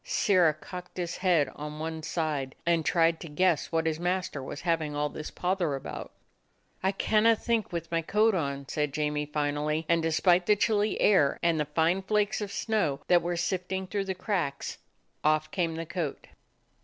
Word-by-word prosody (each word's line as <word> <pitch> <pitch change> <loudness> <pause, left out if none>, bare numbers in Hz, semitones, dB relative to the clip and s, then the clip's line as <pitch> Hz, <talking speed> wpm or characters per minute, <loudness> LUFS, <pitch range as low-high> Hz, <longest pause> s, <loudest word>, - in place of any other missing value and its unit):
Sirrah 180 - +3
cocked 180 0 -9
his 175 -1 -3
head 175 -6 +3
on 150 +1 -6
one 160 +1 -4
side, 150 -5 -2
and 170 -1 +2
tried 165 +1 +2
to 170 - -8
guess 165 +1 +1
what 165 -1 +1
his 160 -1 0
master 180 -4 -1
was 140 +3 -7
having 165 -4 0
all 150 0 0
this 155 +1 -7
pother 180 -5 -1
about. 135 - -7 0.7
"I 190 - +2
canna 215 +3 +3
think 230 -1 -1
with 170 -1 -4
my 165 0 +1
coat 215 +6 +3
on," 140 -5 -2
said 150 -1 -2
Jamie 150 0 -1
finally, 150 +1 -1
and 170 0 +3
despite 175 +2 +3
the 210 - +6
chilly 210 0 +1
air 170 -9 +4
and 170 -2 +2
the 150 - +1
fine 160 +5 +1
flakes 210 +2 0
of 205 -1 -4
snow 200 -12 0
that 175 -1 +6
were 175 0 -2
sifting 185 +1 -2
through 195 +1 -2
the 190 -1 -3
cracks, 180 -7 -2 0.4
off 155 0 +2
came 170 -4 -1
the 165 +1 -4
coat. 170 -3 -4
170 Hz, 180 wpm, -28 LUFS, 150-185 Hz, 0.7 s, the